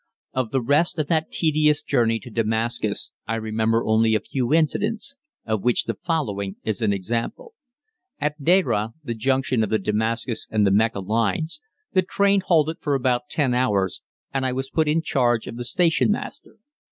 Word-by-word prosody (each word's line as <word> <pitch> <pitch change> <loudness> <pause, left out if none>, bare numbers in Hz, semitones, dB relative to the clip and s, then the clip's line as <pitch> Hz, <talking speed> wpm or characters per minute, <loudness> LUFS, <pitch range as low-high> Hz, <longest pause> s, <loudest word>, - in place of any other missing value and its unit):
Of 130 -3 -1
the 130 +1 0
rest 150 +8 +2
of 155 - 0
that 160 -2 +1
tedious 155 -2 +2
journey 115 -4 +2
to 125 - -11
Damascus 115 +1 -1 0.2
I 115 - -1
remember 110 +1 0
only 110 0 +3
a - - +3
few 125 +4 -3
incidents, 210 - +1 0.3
of 110 -2 -1
which 125 +2 +2
the - - -2
following 105 - -2
is 110 +1 -2
an 110 -2 +2
example. 115 - -3 0.7
At 150 0 -2
Deraah, 135 - +2
the 120 - -3
junction 130 0 +1
of 105 - -2
the 110 - +2
Damascus 110 +3 -1
and 105 -2 +2
the 100 - +3
Mecca 105 0 +2
lines, 115 - -1 0.3
the 185 - +4
train 200 +2 +2
halted 165 -3 +2
for 145 -3 0
about 130 +1 0
ten 140 -5 +1
hours 105 -7 +1 0.3
and 135 -1 0
I 130 -1 0
was 135 +1 -4
put 160 -1 +1
in 160 +2 +1
charge 120 -6 +1
of - - -7
the 120 - -3
station 170 - +2
master. 215 - -5
125 Hz, 175 wpm, -23 LUFS, 110-155 Hz, 0.7 s, the